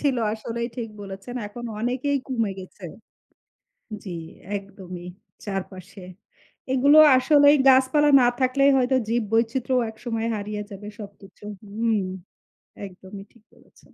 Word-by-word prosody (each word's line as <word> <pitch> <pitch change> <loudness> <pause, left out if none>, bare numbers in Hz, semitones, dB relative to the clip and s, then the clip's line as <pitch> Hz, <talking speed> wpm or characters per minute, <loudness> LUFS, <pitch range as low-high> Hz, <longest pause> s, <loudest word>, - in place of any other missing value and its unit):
ছিল। 275 -4 +1 0.2
আসলেই 235 +2 -4
ঠিক 230 -2 -4
বলেছেন। 195 +5 -8
এখন 240 +4 -9 0.2
অনেকেই 260 +4 -1
কমে 230 -6 -1
গেছে। 185 0 -13 1.2
জি 190 - -8 0.5
একদমই 190 -3 -9 0.4
চারপাশে। 190 -1 -7 0.7
এগুলো 280 +4 +5 0.2
আসলেই 285 +2 +5
গাছপালা 265 +3 +4
না 245 - +4
থাকলেই 275 +2 +3
হয়তো 260 0 +2
জীব 235 +1 +1
বৈচিত্র্যও 245 +3 +1
একসময় 225 0 -4
হারিয়ে 210 0 -4
যাবে 205 +1 -9
সবকিছু। 200 -1 -13 0.3
হুম 225 0 0 0.9
একদমই 190 +1 -11
ঠিক 235 -3 -24
বলেছেন। - - -24
230 Hz, 115 wpm, -24 LUFS, 200-255 Hz, 1.2 s, এগুলো